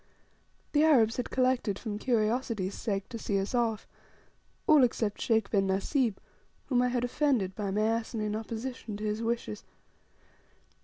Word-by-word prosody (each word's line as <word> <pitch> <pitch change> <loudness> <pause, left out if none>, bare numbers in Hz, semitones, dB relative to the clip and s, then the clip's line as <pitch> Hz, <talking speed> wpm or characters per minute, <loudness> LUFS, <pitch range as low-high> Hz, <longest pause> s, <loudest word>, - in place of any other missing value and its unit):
The 300 0 +4
Arabs 240 -8 +4
had 250 - -2
collected 255 -6 +1
from 210 -2 -5
curiosity's 220 -4 0
sake 195 -3 -3
to 230 - -6
see 200 -2 -1
us 195 +5 -3
off 230 -3 0 0.8
all 305 -3 +6
except 225 -4 0
Sheikh 225 -3 +1
bin 195 -2 +2
Nasib, 215 +4 +1 0.5
whom 250 -3 +2
I 250 - +3
had 245 -1 0
offended 245 -7 +1
by 205 -1 -3
my 205 +2 0
asinine 220 -1 -1
opposition 225 0 -5
to 210 - -7
his 215 +1 -1
wishes. 230 - -2
225 Hz, 150 wpm, -30 LUFS, 210-245 Hz, 0.8 s, all